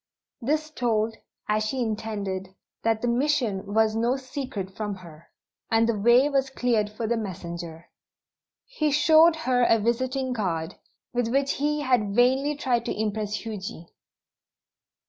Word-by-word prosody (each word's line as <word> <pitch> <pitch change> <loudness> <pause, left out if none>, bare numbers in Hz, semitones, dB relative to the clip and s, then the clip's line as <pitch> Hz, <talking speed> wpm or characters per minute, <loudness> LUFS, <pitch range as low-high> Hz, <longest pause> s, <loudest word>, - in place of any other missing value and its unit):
This 305 +5 -1
told, 225 -5 0 0.3
as 215 0 +1
she 235 +5 -2
intended, 205 -4 -4 0.3
that 225 0 0
the - - +1
"mission" 235 -6 0
was 220 0 +3
no 235 +4 +1
secret 255 -8 -6
from 210 -2 -3
her; 170 -3 -14 0.4
and 225 0 +3
the 230 - +1
way 240 +6 +5
was 270 -2 +1
cleared 235 -5 0
for 215 +2 -5
the 235 +2 +1
messenger. 170 -5 -6 0.8
He 325 -12 -1
showed 315 +3 +6
her 250 -1 +3
a 230 -1 +5
visiting 255 +4 -1
card, 170 -8 -2 0.4
with 245 -1 0
which 275 +3 +1
he 295 +1 0
had 240 -7 +1
vainly 265 +5 +3
tried 250 -5 0
to 235 - -3
impress 210 -1 -2
Huji. 195 -6 -7
230 Hz, 145 wpm, -26 LUFS, 210-260 Hz, 0.8 s, showed